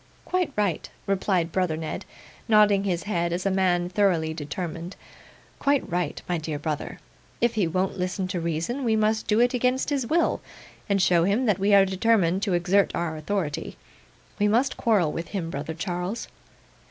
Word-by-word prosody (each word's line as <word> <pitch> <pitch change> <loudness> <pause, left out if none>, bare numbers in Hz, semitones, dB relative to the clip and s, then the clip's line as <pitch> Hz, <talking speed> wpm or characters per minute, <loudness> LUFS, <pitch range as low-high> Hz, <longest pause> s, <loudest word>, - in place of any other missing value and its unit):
'Quite 365 -4 0
right,' 200 -6 -1 0.2
replied 190 -3 0
brother 180 -4 0
Ned, 160 -1 -5 0.4
nodding 210 -3 +5
his 180 -3 -1
head 170 -4 -1
as 180 +2 -2
a 195 - +2
man 180 -2 +2
thoroughly 180 -4 +1
determined; 165 +3 -5 0.6
'quite 280 -1 +1
right, 175 +1 -2
my 175 -2 0
dear 155 -1 -4
brother. 150 0 -4 0.4
If 235 -1 +2
he 210 -6 +1
won't 185 +3 -1
listen 185 +1 -2
to 185 -2 -2
reason, 170 - -2
we 225 -3 +2
must 215 0 +1
do 215 +1 +3
it 245 +1 +3
against 255 +3 +1
his 270 -4 0
will, 335 +5 +1 0.5
and 200 -1 +2
show 175 -2 +4
him 210 +7 +1
that 205 -5 +2
we 200 +1 +4
are 195 -1 +7
determined 190 -2 +2
to 200 -3 0
exert 185 +3 +2
our 170 -2 -2
authority. 155 -1 -3 0.6
We 205 - +3
must 240 +6 +2
quarrel 205 -10 +2
with 165 +2 -5
him, 170 -5 -4
brother 150 +2 -4
Charles. 180 +4 -3
190 Hz, 175 wpm, -25 LUFS, 170-215 Hz, 0.6 s, are